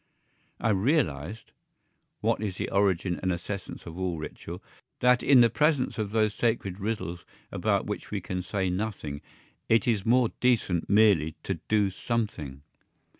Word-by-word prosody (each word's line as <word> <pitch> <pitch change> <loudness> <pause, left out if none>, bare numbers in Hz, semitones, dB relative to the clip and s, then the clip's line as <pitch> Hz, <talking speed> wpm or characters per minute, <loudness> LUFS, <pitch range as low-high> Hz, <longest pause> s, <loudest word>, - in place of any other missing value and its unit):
I 115 - +1
realised 100 - 0 0.7
(what - - +1
is 100 -4 -3
the - - -3
origin 95 -2 +1
and 95 - 0
essence 90 +2 -5
of 85 +1 -8
all 90 -3 -1
ritual) 85 +3 -7 0.4
that 125 0 +4
in 135 -3 +6
the 120 - +6
presence 150 -6 +1
of 105 -2 -1
those 110 -1 +1
sacred 105 -5 -1
riddles 100 -5 -3 0.3
about - - 0
which - - -5
we 105 - -2
can 90 0 -4
say 95 +1 -2
nothing 90 -7 -3 0.5
it 115 0 +3
is 110 -5 +2
more 120 +1 +4
decent 110 -9 +1
merely 100 -7 +4
to - - -3
do 105 -2 +2
something. 90 - -3
100 Hz, 150 wpm, -28 LUFS, 90-115 Hz, 0.7 s, in